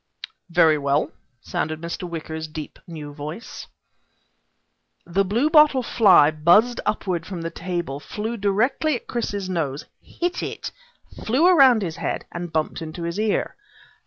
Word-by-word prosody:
"Very 165 -3 +4
well," 140 +1 0 0.3
sounded 155 0 -3
Mr. 170 +2 -5
Wicker's 160 -1 -5
deep 155 0 -8
new 150 -4 -8
voice. 155 +9 -8 1.4
The 190 +3 +1
bluebottle 270 - +4
fly 190 -11 +5
buzzed 175 +11 +3
upward 185 -5 -1
from 180 -4 -6
the 165 - -4
table, 170 -5 -4
flew 215 +9 -5
directly 230 +9 +1
at 240 - -7
Chris's 205 -5 -3
nose, 155 -6 -3 0.2
hit 350 +1 -3
it, - - -5 0.5
flew 260 +9 +2
around 270 - +6
his 165 -3 -4
head, - - -3
and 175 -1 -6
bumped 155 +1 -2
into 160 +1 -6
his 170 +4 -3
ear. 215 -1 0
175 Hz, 135 wpm, -23 LUFS, 160-220 Hz, 1.4 s, around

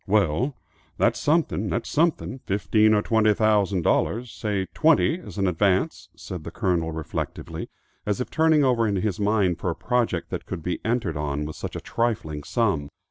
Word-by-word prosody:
"Well, 105 - +2 0.4
that's - - +2
something, 145 - +1
that's 120 - -2
something, 150 -4 0
fifteen 105 +3 +3
or 105 - +2
twenty 110 -2 +3
thousand 100 -5 +2
dollars, 120 +6 +1
say 100 -3 -2
twenty 160 +2 +3
as 180 - -11
an 100 - +1
advance," 95 +1 +1
said 90 -4 -7
the - - -6
Colonel 85 -4 0
reflectively, 80 -1 -5 0.3
as 105 +1 -1
if 125 - -4
turning 160 -2 +4
over 120 -4 +3
his 100 -1 -1
mind 100 -4 +2
for 90 - -1
a 85 - -2
project 120 -8 -1
that - - -5
could 80 - -5
be 90 +1 -3
entered 115 -9 -1
on 75 0 -2
with 75 - -6
such - - -6
a - - -4
trifling 90 -11 -2
sum. 100 - 0
105 Hz, 175 wpm, -25 LUFS, 90-120 Hz, 0.4 s, turning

